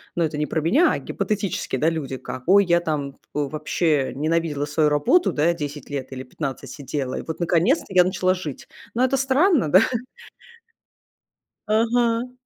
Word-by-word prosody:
"Ну, 170 - +1
это 155 -1 -2
не 150 - -1
про 160 - -1
меня, 190 - +3
а - - 0
гипотетически, 205 - -3
да, 155 +5 +2
люди, 140 -5 -4
как, 130 - -8
ой, 200 +2 +6
я 170 -1 +3
там, 150 -4 -2
э, - - -15 0.2
вообще 150 0 0
ненавидела 155 0 -1
свою 150 +1 +1
работу, 150 - +3
да, 150 - 0
я - - +2
10 145 -4 -6
лет 135 -2 -5
или 130 -1 -6
15 135 0 -6
сидела, 135 -2 -4
и - - -4
вот 160 - -6
наконец-то 175 - +2
я 185 -2 +5
начала 185 0 +1
жить." 165 -7 -7 0.3
Но 245 - +2
это 260 - +1
странно 270 - +2
да. 185 - +8 1.9
Ага. 230 +2 +1
160 Hz, 175 wpm, -23 LUFS, 145-200 Hz, 1.9 s, да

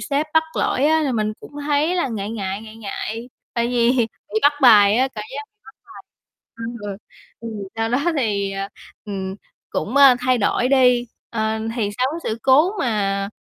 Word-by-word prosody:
sếp 290 +1 -1
bắt 320 - +6
lỗi 265 - +1
á, 315 +1 +3
thì 260 - 0
mình 215 -1 0
cũng - - -12
thấy 300 +4 +2
là 345 - 0
ngại 215 -3 -4
ngại, 200 -2 -4
ngại 220 0 -11
ngại, 225 +2 -5 0.3
tại 235 0 +1
vì 240 -1 +2 0.4
bị - - +4
bắt 290 - +6
bài 210 -4 +7
á, 260 +2 +2
cảm 210 - -5
giác 285 - -4
bị 425 0 -57
bắt 265 - -15
bài. - - -13 0.5
Ừm, 230 +1 -6 0.6
ừ, 230 - -6 0.3
sau 225 0 0
đó 245 +3 +1 0.2
thì, 200 -5 0
ờ, 195 0 -4 0.4
ừm, 190 -2 -4 0.4
cũng, 235 +7 -3
ơ, 275 -3 +8
thay 250 0 +2
đổi 245 +4 +1
đi. 250 -3 +4 0.2
Ờ, 220 -1 -1 0.2
thì 210 -4 0
sau 255 - +2
cái 335 - -5
sự 220 - -3
cố 290 +7 +5
mà 200 - 0
235 Hz, 190 wpm, -21 LUFS, 210-265 Hz, 0.6 s, ơ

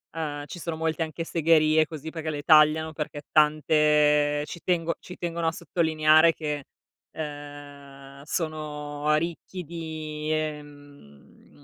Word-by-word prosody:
ehm, 145 -3 -4
ci 175 - -9
sono 165 -1 -4
molte 160 0 -1
anche 160 +1 -5
segherie 160 -1 +3
così 155 0 -7
perché 160 -1 -5
le 145 -2 -4
tagliano, 155 +1 +5
perché 150 -1 -5
tante 150 -1 +3
ci 170 - -9
tengo 170 -2 0
ci 180 - -11
tengono 170 -1 -2
a - - +2
sottolineare 160 -1 +3
che, 150 -3 -4 0.5
uhm, 145 -2 -9
sono 150 -2 -3
ricchi 170 +3 -4
di, 155 -2 -6
ehm, 145 - -7
155 Hz, 125 wpm, -26 LUFS, 145-160 Hz, 0.5 s, tagliano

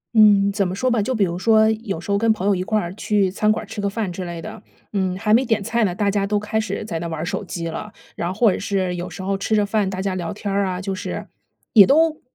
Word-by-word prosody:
嗯， 205 -2 +6
怎 195 -2 +1
么 180 - -4
说 255 +5 0
吧， 235 -3 +2
就 255 +5 -1
比 215 - +2
如 175 -1 -2
说 220 +2 +4
有 215 -5 -4
时 190 - -5
候 200 - +3
跟 225 +1 +3
朋 210 -3 -2
友 205 - +4
一 180 - -1
块 215 +2 0
儿 175 -3 -4
去 205 -2 +1
餐 215 +3 +2
馆 215 - -1
儿 - - -10
吃 205 - -6
个 200 - 0
饭 205 -2 -3
之 180 +1 -5
类 170 -1 -6
的， - - -8 0.3
嗯， 190 -2 -1
还 210 +1 +1
没 240 +4 +5
点 225 -5 0
菜 230 +3 0
呢， 180 -3 -2
大 200 +1 +1
家 200 0 0
都 210 +1 +1
开 210 +1 -2
始 220 - -3
在 170 -6 -4
那 170 - -4
玩 160 -2 -4
儿 - - -2
手 175 - -3
机 170 -2 -5
了。 210 +6 -6 0.2
然 170 - -2
或 215 +2 +3
者 - - -4
是 190 -3 -1
有 175 +1 -5
时 190 - -8
候 195 +1 0
吃 195 +3 -1
着 210 -1 +3
饭， 205 -1 0
大 190 0 -4
家 195 - -1
聊 175 -3 -3
天 200 -1 -4
儿 200 0 +1
啊， 180 -1 -3
就 195 +1 -3
是 185 - -5 0.5
也 205 -4 +8
都 315 +2 +3
200 Hz, 320 characters per minute, -21 LUFS, 185-215 Hz, 0.5 s, 也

